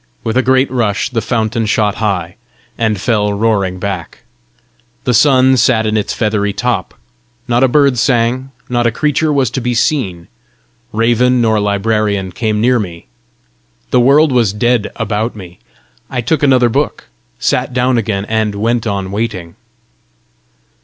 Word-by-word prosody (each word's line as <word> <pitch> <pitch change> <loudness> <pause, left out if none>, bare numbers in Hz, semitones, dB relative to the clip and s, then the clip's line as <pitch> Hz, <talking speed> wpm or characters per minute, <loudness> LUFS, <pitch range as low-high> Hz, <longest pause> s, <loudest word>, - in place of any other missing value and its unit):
With 110 - -2
a 130 - +4
great 130 0 +2
rush 115 -3 -1
the 115 -2 -1
fountain 115 0 -1
shot 105 -1 +1
high, 95 -6 -2 0.4
and 110 -3 -1
fell 105 0 0
roaring 100 -3 0
back. 95 -2 -5 0.8
The 125 - 0
sun 130 +1 +4
sat 110 -1 +2
in 110 0 0
its 105 - -1
feathery 105 -2 -1
top. 120 -5 -2 0.5
Not 120 +1 +2
a - - +5
bird 140 -2 +3
sang, 125 +1 +1 0.2
not 120 -1 +1
a - - +1
creature 150 +4 0
was 135 -5 +1
to 130 - -3
be 120 0 -1
seen. 100 - -1 0.6
Raven 120 +3 +2
nor 110 -2 +2
librarian 100 -1 0
came 110 +2 -1
near 125 +2 +3
me. 85 -5 -6 0.9
The 125 - +4
world 140 +5 +4
was 115 -6 +2
dead 120 +1 0
about 110 +2 -2
me. 90 -4 -11 0.5
I 130 - -3
took 155 +6 0
another 130 -4 +4
book, 135 -1 -1 0.3
sat - - 0
down 125 0 +1
again, 100 -3 -2
and 110 -1 -1
went 115 +2 -1
on 100 -2 -3
waiting. 100 -6 -4
115 Hz, 155 wpm, -14 LUFS, 105-125 Hz, 0.9 s, a